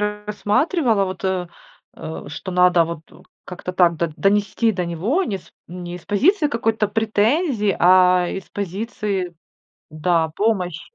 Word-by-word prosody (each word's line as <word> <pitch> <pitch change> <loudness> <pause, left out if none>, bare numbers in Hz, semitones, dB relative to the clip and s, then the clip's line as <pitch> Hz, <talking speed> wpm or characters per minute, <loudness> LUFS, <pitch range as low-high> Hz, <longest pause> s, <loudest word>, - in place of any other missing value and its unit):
рассматривала 210 - 0
вот, 185 0 -6
э, 185 -2 -1 0.5
э, 160 0 -7
что 160 +5 -7
надо 180 -1 +4
вот 165 -1 -8
у 180 +3 -17 0.2
как-то 180 0 -7
так 175 -2 +3
до 170 +1 -1
донести 205 +3 +1
до 180 -2 -2
него, 195 - 0
не 200 -3 -3
с - - -20 0.2
не 175 0 -7
из 180 - -14
позиции 300 - +2
какой-то 225 -4 0
претензии, 220 - +1
а 180 0 +5
из 190 - -6
позиции 200 -2 -3 0.6
Да, 160 0 0
помощи. 185 -7 0
190 Hz, 140 wpm, -21 LUFS, 175-215 Hz, 0.6 s, а